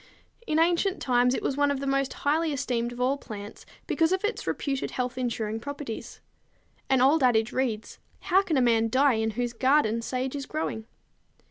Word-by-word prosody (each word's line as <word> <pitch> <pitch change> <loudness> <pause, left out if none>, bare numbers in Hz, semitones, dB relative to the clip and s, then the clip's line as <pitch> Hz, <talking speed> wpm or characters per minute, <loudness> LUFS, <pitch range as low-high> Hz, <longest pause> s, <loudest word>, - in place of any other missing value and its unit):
In 310 - +1
ancient 345 +4 +2
times, 250 0 +2
it - - -4
was 270 - -1
one 290 0 +3
of 280 -1 -1
the 275 - -4
most 275 0 0
highly 315 +2 0
esteemed 250 -4 -1
of 245 - -9
all 265 +3 +1
plants 205 -4 -9 0.2
because 325 0 +1
of 375 +1 0
its 420 +3 -2
reputed 275 -2 -2
health 250 0 -3
insuring 225 -3 -2
properties. 285 -2 -7 0.7
An 265 -2 +3
old 285 +4 +4
adage 235 -3 +3
reads, 235 -5 -2 0.2
"How 380 +1 +3
can 350 -7 -1
a - - +4
man 230 -2 +3
die 265 +3 +4
in 220 - 0
whose 240 -1 -1
garden 240 -3 +2
sage 255 +3 -3
is 280 -1 -5
growing?" 225 -8 -4
260 Hz, 190 wpm, -27 LUFS, 240-290 Hz, 0.7 s, old